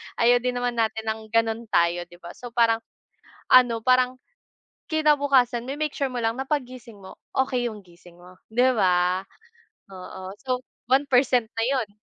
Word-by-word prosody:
Ayaw 240 +1 +4
din 250 0 -2
naman 245 -1 -2
natin 220 0 0
ng 220 0 -8
ganun 225 +1 0
tayo 175 -2 +1
'di 175 - -16
ba? 175 - -8
So 245 -2 -11
parang 230 -1 +3 0.7
ano 240 -3 +5
parang 255 +1 +3 0.7
kinabukasan 280 -6 +2
ma-make 295 +2 -3
sure 275 - 0
mo 255 - -7
lang 225 +2 -1
na 265 - -3
paggising 255 -6 -4
mo 190 - -11 0.2
okay 260 -2 0
yung 215 -3 -6
gising 175 -1 -19
mo 180 +1 -17
'di 250 +3 +2
ba? 180 0 +2 0.7
Oo, 185 0 -9
so 255 -1 -3 0.2
1% 255 -2 +3
na 225 - -3
yun. 260 -6 0
240 Hz, 160 wpm, -24 LUFS, 215-255 Hz, 0.7 s, ano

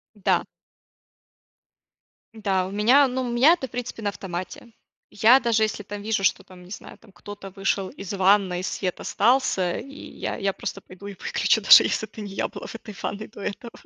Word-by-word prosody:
Да. 205 - +1 1.9
Да, 195 -4 -1
у - - -8
меня, 245 +8 +4
ну, 260 0 -3
у 250 - -3
меня 250 +7 +5
это, 300 -7 -3
в - - -29
принципе, 245 -2 -6
на 205 - -1
автомате. 185 +3 -7 0.4
Я 230 +6 +5
даже 230 -3 +1
если 215 -1 -2
там 205 +1 -7
вижу, 215 -1 -1
что, - - +1
там, 180 -1 -15
не 180 - -15
знаю, - - -9
там 225 - -20
кто-то 200 +2 -10
вышел 195 0 -1
из 195 0 -8
ванной, 190 -2 +3
свет 185 -1 -3
остался, 205 -7 +1
и 275 - -10
я - - -6
я 200 -2 -1
просто 195 - -6
пойду 190 +2 -12
и 200 - -7
выключу, 475 - 0
даже - - +9
если - - -1
это - - -13
не 205 -2 -7
я - - -2
была - - -9
в - - -9
этой 220 -1 -9
ванной 215 +1 -4
до 215 - -15
этого. 230 +4 -6
205 Hz, 200 wpm, -24 LUFS, 195-235 Hz, 1.9 s, даже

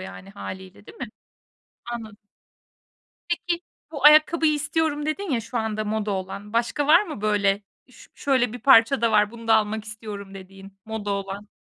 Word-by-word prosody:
yani, 190 +1 -10
hâliyle, 190 0 -9
değil - - -14
mi? 265 - -4 0.8
Anladım. 225 -3 -7 1.1
Peki, 345 0 -1 0.3
"Bu 290 -4 -7
ayakkabıyı 310 +1 +6
istiyorum." 295 0 -1
dedin 370 +4 -3
ya 245 -4 +1
şu 230 +2 -4
anda 215 -1 -2
moda 215 0 -2
olan. 195 +2 -5
Başka 240 +5 0
var 335 +5 +7
mı 315 - -7
böyle, 205 -1 +1 0.3
"Üş 250 - -17
şöyle 255 -4 +1
bir 245 - -6
parça 265 +1 +5
da 230 -1 +2
var, 210 -1 +3
bunu 230 0 -11
da 225 - +6
almak 215 0 0
istiyorum." 210 -2 -8
dediğin, 195 +1 -13
moda 220 -2 -5
olan? 200 +1 -4
220 Hz, 165 wpm, -24 LUFS, 205-275 Hz, 1.1 s, var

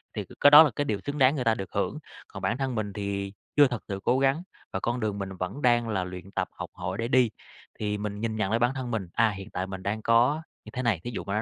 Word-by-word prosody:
thì - - -3
cái 145 - +7
đó 150 +2 +12
là 145 - +1
cái 145 - 0
điều 105 -6 -1
xứng 145 +1 -3
đáng 135 +2 +5
người 130 - -1
ta 115 -1 +3
được 95 - -6
hưởng, - - -1 0.3
còn - - -9
bản 120 - 0
thân 135 -2 -2
mình 105 -3 -2
thì 100 -1 -3 0.2
chưa 145 -2 +7
thật 120 -3 -5
sự 100 -2 -4
cố 130 - +3
gắng 135 +5 +2 0.3
và 95 - -1
con 120 +4 -1
đường 105 -2 -2
mình 95 0 -4
vẫn 95 +10 -4
đang 120 -3 +3
là 95 -3 0
luyện 90 +1 -8
tập, - - -1
học - - -7
hỏi 95 +2 -4
để 115 - -1
đi. 125 -2 +4 0.5
Thì 105 -1 -1
mình 105 0 -4
nhìn 110 -1 -1
nhận 110 -3 0
lại 115 +1 +1
bản 120 +2 +2
thân 130 -2 -4
mình, 100 -5 -2
à, 115 -1 +4
hiện 95 +1 -8
tại 95 +1 -3
mình 95 -1 -7
đang 110 +2 -2
có 120 +8 +3 0.2
như - - -9
thế 130 - -2
này, 110 -9 +1
thí 120 - -4
dụ - - -4
mà 100 +1 -4
110 Hz, 290 wpm, -27 LUFS, 100-125 Hz, 0.5 s, đó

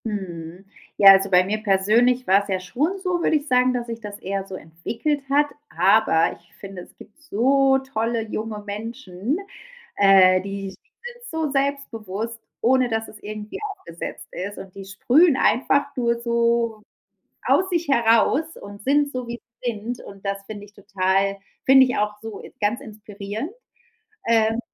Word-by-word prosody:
Mhm. 180 -4 -6 0.3
Ja, 195 -1 +10
also 195 0 +4
bei 180 -1 +5
mir 210 +3 -2
persönlich 230 +5 +3
war's 200 +2 +3
ja 190 -2 -1
schon 290 - -2
so, 360 -2 -1
würde - - +2
ich 295 0 -1
sagen, 255 0 +3
dass 245 -1 -3
sich 230 -1 -5
das 205 -2 -7
eher 195 +1 -3
so 190 - -7
entwickelt 230 - -3
hat. 290 +1 +3 0.2
Aber 180 -2 +3
ich 170 - -29
finde, 195 -2 -9
es - - -19
gibt 210 - -16
so 270 0 +3
tolle 230 -3 -2
junge 215 0 -4
Menschen, 220 - -4 0.6
äh, 190 -2 +6
die 195 0 -5
sind 485 - -13
so 320 -3 -2
selbstbewusst, 230 -6 -3 0.2
ohne 255 +1 +3
dass 225 0 -2
es 215 - -13
irgendwie 210 0 -7
aufgesetzt 170 - -8
ist 200 +3 -6
und 190 -1 -10
die 195 -1 -8
sprühen 260 - +3
einfach 280 +4 +2
nur 235 -2 0
so 235 -1 +1 0.7
aus 375 - +3
sich 340 -3 -1
heraus 250 +6 +2
und 200 0 -11
sind 285 +4 +2
so, 255 -1 -4
wie 235 0 -6 0.2
sie 240 - 0
sind 225 +3 -6
und 195 0 -13
das 195 0 -3
finde 205 -1 -8
ich 205 - -17
total 195 -1 0 0.3
finde 265 0 +7
ich 250 - -2
auch 210 0 -1
so, 225 -2 -7
äh, - - -12
ganz 210 +3 0
inspirierend. 210 - -7 0.8
Ähm, 225 0 +3
220 Hz, 165 wpm, -23 LUFS, 195-255 Hz, 0.8 s, Ja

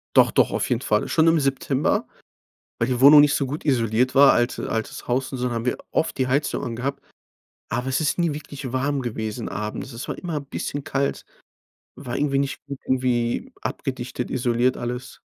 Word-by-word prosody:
Doch, - - +6
doch, - - +3
auf - - -1
jeden 125 0 +1
Fall. 105 -4 +1
Schon 160 0 +3
im 165 -1 +5
September, 135 0 0 0.7
weil 115 - 0
die 125 -1 -1
Wohnung 145 +2 +10
nicht 145 0 +5
so 140 - 0
gut 150 +4 -5
isoliert 125 -2 +1
war. 140 0 +8
Alt 120 0 +1
altes 110 -1 -4
Haus 130 +2 0
und 130 - -4
so 125 - -1
dann 120 - -2
haben 115 0 -3
wir - - +1 0.2
oft 160 - 0
die 130 - +2
Heizung 140 +4 0
angehabt. 125 +4 -3 0.7
Aber 125 +3 -2
es 130 - +1
ist 155 +1 0
nie 170 -4 +1
wirklich 145 -3 -7
warm 140 +1 0
gewesen, 110 -1 -4
abends. 105 +5 -5
Es 115 - -6
war - - -4
immer 170 -4 -4
'n 140 - -5
bisschen 145 +1 -4
kalt, 140 0 -2 0.7
war 125 -3 -5
irgendwie 140 -1 +1
nicht 140 0 -2
gut 140 -1 -6
irgendwie 130 - 0
abgedichtet, 130 -2 -4
isoliert 125 0 +1
alles. 125 +1 -5
130 Hz, 195 wpm, -23 LUFS, 120-140 Hz, 0.7 s, Wohnung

